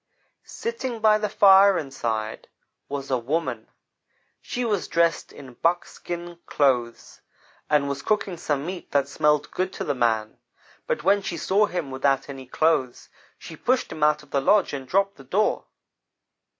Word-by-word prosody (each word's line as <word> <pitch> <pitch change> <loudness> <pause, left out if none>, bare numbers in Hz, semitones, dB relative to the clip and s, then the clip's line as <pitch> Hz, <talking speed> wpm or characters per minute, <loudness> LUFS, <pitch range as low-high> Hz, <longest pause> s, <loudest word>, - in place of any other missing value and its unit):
"Sitting 260 - -4
by 215 -1 +4
the 210 -1 -1
fire 195 -1 +6
inside, 115 -6 -4 0.4
was 140 -1 -5
a 130 - +2
woman. 130 -3 -2 0.7
She 245 0 -3
was 205 -5 -1
dressed 170 -1 +1
in 130 -3 -12
buckskin 175 +2 -3
clothes, 125 -5 0 0.5
and 150 -2 +2
was 140 0 -3
cooking 210 -3 -1
some 145 -2 -2
meat 180 +1 -6
that 140 -1 +2
smelled 150 0 +1
good 185 0 -2
to - - -4
the 145 - -1
man, 110 -4 0 0.5
but - - -1
when 200 +3 +3
she 175 -3 -4
saw 205 +5 +2
him 175 -8 -4
without 135 +1 0
any 135 -2 -8
clothes, 130 -4 0 0.3
she 160 - -10
pushed 255 - 0
him 155 - -7
out 150 0 +3
of 150 - -21
the 140 - +1
lodge, 205 +5 +3
and 135 -2 -5
dropped 195 +5 +1
the 135 - -13
door. 195 +11 0
150 Hz, 160 wpm, -24 LUFS, 135-195 Hz, 0.7 s, fire